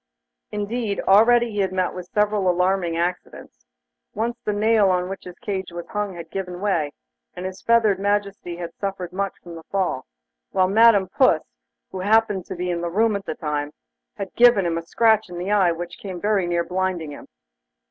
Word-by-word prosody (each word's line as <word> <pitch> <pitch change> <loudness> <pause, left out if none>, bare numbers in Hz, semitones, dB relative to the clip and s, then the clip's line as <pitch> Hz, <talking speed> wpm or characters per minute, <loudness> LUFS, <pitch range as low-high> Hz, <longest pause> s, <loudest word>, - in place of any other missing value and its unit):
Indeed, 210 0 -2
already 235 +4 +5
he 205 - -3
had 190 -1 +1
met 185 -1 0
with 180 -1 -7
several 210 -2 +2
alarming 180 -1 +1
accidents. 170 - -4 0.5
Once 235 +2 -2
the 210 - 0
nail 210 -1 +3
on 180 0 0
which 195 - -7
his 180 -1 -10
cage 190 -3 -4
was 175 0 -6
hung 205 -3 -3
had 165 -1 -9
given 180 -2 -5
way, 175 -7 0 0.4
and 180 - -6
his 185 0 -6
feathered 225 -4 +3
Majesty 200 -3 -1
had 170 -1 -6
suffered 190 -3 -5
much 195 0 -2
from 175 - -10
the 165 - -9
fall, 185 -9 -1 0.4
while 185 -1 +2
Madam 210 -1 +5
Puss, 260 +8 +3 0.5
who 190 - -5
happened 205 -1 +2
to - - -5
be 180 0 -2
in 170 -1 -2
the 175 - -2
room 215 +4 +2
at 200 - -4
the - - -4
time, 150 -1 -3 0.4
had 200 -2 -6
given 240 -6 +5
him 165 -1 0
a 165 - -12
scratch 220 -1 +3
in 175 - -7
the 180 +3 -3
eye 195 -4 +4
which 170 +1 -6
came 185 -3 -6
very 205 -2 +1
near 170 0 +1
blinding 180 -3 -2
him. 145 - -10
190 Hz, 195 wpm, -23 LUFS, 175-210 Hz, 0.5 s, already